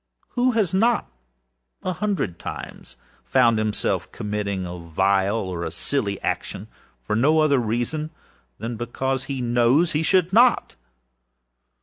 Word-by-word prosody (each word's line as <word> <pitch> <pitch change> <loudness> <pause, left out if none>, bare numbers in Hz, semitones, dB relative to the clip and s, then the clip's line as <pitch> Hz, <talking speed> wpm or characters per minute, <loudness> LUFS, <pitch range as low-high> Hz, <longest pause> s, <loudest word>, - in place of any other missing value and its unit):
Who 250 0 +1
has 210 -7 +1
not, 225 - +2 0.7
a 185 - -1
hundred 180 - -2
times, - - -8 0.3
found 120 -4 +3
himself 110 -1 -1
committing 100 -2 -3
a 90 0 -6
vile 95 +5 +1
or 90 -5 -3
a 80 - -2
silly 100 - -2
action, - - -3 0.3
for 105 - -1
no 145 +8 +3
other 155 -3 +4
reason 120 +7 -2 0.5
than 115 +2 -5
because 130 +3 -2
he 135 -3 -3
knows 120 +8 +3
he 150 - 0
should 180 +2 +2
not? 240 +3 +4
120 Hz, 130 wpm, -23 LUFS, 105-160 Hz, 0.7 s, other